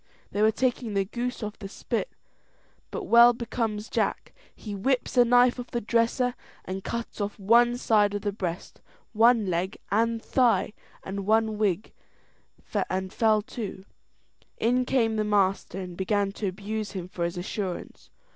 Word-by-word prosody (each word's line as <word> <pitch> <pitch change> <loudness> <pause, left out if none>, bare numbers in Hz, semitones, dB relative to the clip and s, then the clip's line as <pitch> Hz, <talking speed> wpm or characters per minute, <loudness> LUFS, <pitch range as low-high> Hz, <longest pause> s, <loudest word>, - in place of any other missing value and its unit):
They 205 - -1
were 215 - +6
taking 240 -2 -1
the 195 -1 +2
goose 245 +3 -4
off 210 0 -6
the 195 - -7
spit, - - -3 0.8
but 455 - -5
well 240 -6 +7
becomes 225 -2 -3
Jack - - -2 0.2
he 210 - -7
whips 250 +8 -1
a 245 - +7
knife 245 +1 +4
off 245 - -6
the 240 - -2
dresser, 235 +3 +1 0.3
and 190 +1 -5
cuts 235 -2 -5
off 205 0 -3
one 235 +4 +4
side 210 -4 +2
of 205 - -4
the 205 - 0
breast, 180 -3 -5 0.3
one 230 0 +5
leg 185 +2 -2
and 230 +2 +2
thigh, 240 -2 +2 0.3
and 195 0 -5
one 220 -1 +2
wing, 205 -1 +1 1.1
and 190 +1 -3
fell 215 -2 +3
to. 215 -5 -6 0.7
In 250 +3 +2
came 225 -4 +1
the 215 - +1
master, 195 -3 +1
and 180 -2 -6
began 200 +1 0
to 205 0 -4
abuse 210 +3 -4
him 180 -3 -5
for 180 -1 -4
his 170 +1 -2
assurance. 185 0 -5
215 Hz, 160 wpm, -27 LUFS, 195-235 Hz, 1.1 s, well